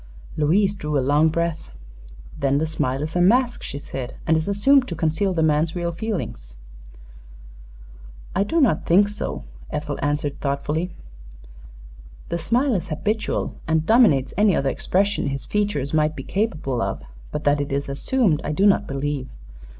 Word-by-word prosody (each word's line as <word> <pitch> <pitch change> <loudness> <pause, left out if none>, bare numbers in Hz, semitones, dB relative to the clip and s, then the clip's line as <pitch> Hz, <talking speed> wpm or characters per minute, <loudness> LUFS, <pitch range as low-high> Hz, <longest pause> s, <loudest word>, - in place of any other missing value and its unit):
Louise 190 +7 +2
drew 150 -7 -2
a - - +3
long 145 +4 +3
breath. 170 - -2 0.7
"Then 140 -1 +2
the 155 - +1
smile 135 -3 -1
is 155 +2 -5
a 175 - +3
mask," 245 +6 +3
she 140 - -6
said, 130 -3 -6
"and 160 - +3
is 160 0 -1
assumed 250 +7 +4
to 170 - -4
conceal 160 +5 0
the 165 -3 +1
man's 155 +2 +2
real 170 -1 -1
feelings." 170 - -5 1.8
"I 190 - +2
do 325 +11 0
not 230 - +2
think 200 +4 +5
so," 210 - -5 0.3
Ethel 150 -1 -4
answered, 145 0 -1
thoughtfully. 150 +5 -1 1.4
"The 170 - -2
smile 245 - +1
is 185 - -1
habitual, 210 +8 -2
and 160 0 +1
dominates 210 - +4
any 205 -3 +4
other 135 - +1
expression 200 +4 0
his 135 -1 -3
features 205 -10 -1
might 155 0 +2
be - - -6
capable 155 - -1
of; - - -3 0.3
but 150 - -4
that 145 0 +2
it 140 - -4
is 140 +1 -1
assumed 160 - +1
I 150 - -2
do 195 +6 +2
not 200 - +4
believe. 140 -1 -3
160 Hz, 165 wpm, -23 LUFS, 145-200 Hz, 1.8 s, think